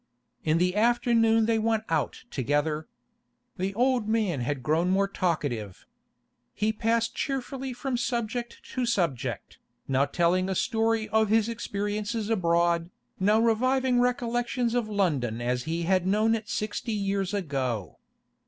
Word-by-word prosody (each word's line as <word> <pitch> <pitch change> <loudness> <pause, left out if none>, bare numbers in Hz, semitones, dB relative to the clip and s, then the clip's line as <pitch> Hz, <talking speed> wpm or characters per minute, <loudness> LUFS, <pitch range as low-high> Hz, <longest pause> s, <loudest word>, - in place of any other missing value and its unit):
In 155 +1 +2
the 180 +2 +1
afternoon 225 0 +3
they 225 0 +2
went 220 0 +1
out 155 -6 -1
together. 145 +4 -1 0.7
The 190 +2 -1
old 245 -2 +2
man 215 - +1
had 130 +1 -2
grown 160 +6 +1
more 195 +1 +2
talkative. 145 - -2 0.7
He 215 +1 +1
passed 230 +1 0
cheerfully 270 -1 -3
from 250 +1 -3
subject 240 0 -3
to 255 -2 -1
subject, 170 - -2 0.3
now 135 +1 +2
telling 175 +5 +1
a 190 - -1
story 225 +2 +1
of 220 0 +2
his 220 0 +3
experiences 210 0 -3
abroad, 170 -3 +2 0.3
now 210 +3 +4
reviving 250 +3 +2
recollections 240 0 0
of 240 -3 0
London 145 - 0
as 125 +1 -1
he 165 +1 -2
had 185 +1 +2
known 215 +3 +3
it 215 -2 -3
sixty 215 +2 -2
years 195 -2 -1
ago. 135 - -3
210 Hz, 135 wpm, -27 LUFS, 170-230 Hz, 0.7 s, now